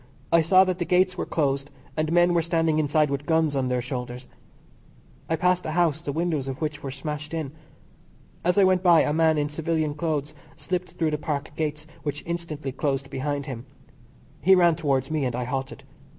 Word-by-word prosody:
I 170 0 +6
saw 185 +4 +6
that 185 -1 -1
the - - +1
Gates 185 +1 +3
were - - -3
closed 140 -2 0 0.3
and 155 0 -1
men 175 +1 +4
were 170 - +3
standing 165 -1 +1
inside 150 -1 +2
with 140 +1 -3
guns 160 -3 +2
on 130 -1 0
their 125 -1 0
shoulders. 125 0 -5 1.0
I 165 - +2
passed 180 +2 +2
a 155 - -2
house, 165 -3 +2
the 145 - -3
windows 155 -3 -1
of 135 -1 -4
which 150 -1 -3
were 135 - -5
smashed 150 +3 -5
in. 155 -4 -3 0.9
As 180 +3 +2
I 200 - +6
went 185 -1 +4
by 175 -3 +6
a 150 - +1
man 160 0 +3
in 145 0 +1
civilian 155 0 -1
clothes 150 -1 -2 0.2
slipped 180 0 -3
through 160 -2 0
the 150 - -1
Park 145 -2 -3
gates, 150 -1 -3 0.2
which 145 -1 -4
instantly 160 -5 -4
closed 135 0 -2
behind 140 +1 -2
him. 130 -1 -7 0.7
He 190 +1 +6
ran 175 -3 +5
towards 140 -4 0
me, 155 -2 0
and 125 -2 -1
I 125 - -2
halted. 130 +1 -4
155 Hz, 200 wpm, -25 LUFS, 140-170 Hz, 1.0 s, I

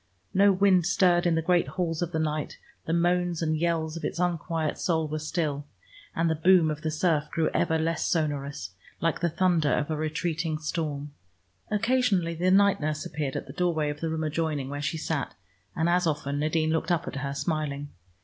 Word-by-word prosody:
No 200 +1 +5
wind 185 -2 +4
stirred 180 -1 +3
in 170 - +2
the 165 - 0
great 175 0 +2
halls 170 -3 -2
of 175 -1 -1
the 160 - -1
night, 155 -1 -2 0.3
the - - -1
moans 175 0 +1
and 155 -1 +1
yells 160 -1 0
of 165 - -7
its - - -3
unquiet 170 -3 -1
soul 160 -3 0
were 155 +1 -3
still, 150 -2 -2 0.5
and 165 +1 +1
the 160 - +2
boom 160 0 +4
of 150 0 -5
the 160 - -1
surf 155 -1 +1
grew 160 -1 0
ever 160 - +2
less 160 0 0
sonorous, 145 - -2 0.3
like 165 -1 0
the 170 - +1
thunder 170 -3 +2
of 150 +1 0
a - - 0
retreating 155 +1 -2
storm. 150 -2 -3 0.6
Occasionally 215 -6 +1
the 175 +3 +1
night 200 0 +4
nurse 155 0 -2
appeared 145 -3 -3
at - - -3
the - - -10
doorway 165 -5 0
of 145 - -8
the 165 - -2
room 160 0 -2
adjoining, 155 -3 -1
where 145 0 -4
she 160 +3 -2
sat, 155 -6 -3 0.4
and 160 - +1
as 175 0 +2
often 145 -2 -1
Nadine 155 +1 +1
looked 160 +1 -1
up 170 -3 0
at - - -5
her 140 0 -3
smiling. 145 -1 -2
160 Hz, 200 wpm, -27 LUFS, 150-175 Hz, 0.6 s, No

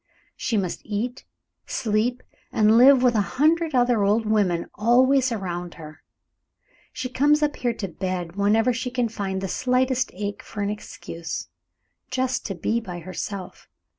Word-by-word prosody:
She 230 -4 -1
must 185 -4 -2
eat, 225 +4 -4 0.4
sleep, 240 +1 0 0.3
and 215 0 +4
live 255 +2 +7
with 250 -1 +5
a 215 - +3 0.2
hundred 315 +1 +3
other 245 -4 +3
old 210 +3 +2
women 200 -6 +1
always 255 +4 +3
around 180 -5 -4
her. 155 -1 -11 0.9
She 255 0 -4
comes 295 +4 +3
up 295 -1 +1
here 240 -2 -1
to 200 - -4
bed 180 -1 -4
whenever 215 +5 +3
she 250 +2 -3
can 245 -2 0
find 195 -3 -3
the 195 - -2
slightest 255 +3 +1
ache 205 +1 -4
for 210 -2 -5
an 200 - 0
excuse, 170 -5 -6 0.6
just 255 0 -1
to 195 - -4
be 220 +7 0
by 180 -6 -7
herself. 185 +2 -6
225 Hz, 155 wpm, -24 LUFS, 195-255 Hz, 0.9 s, live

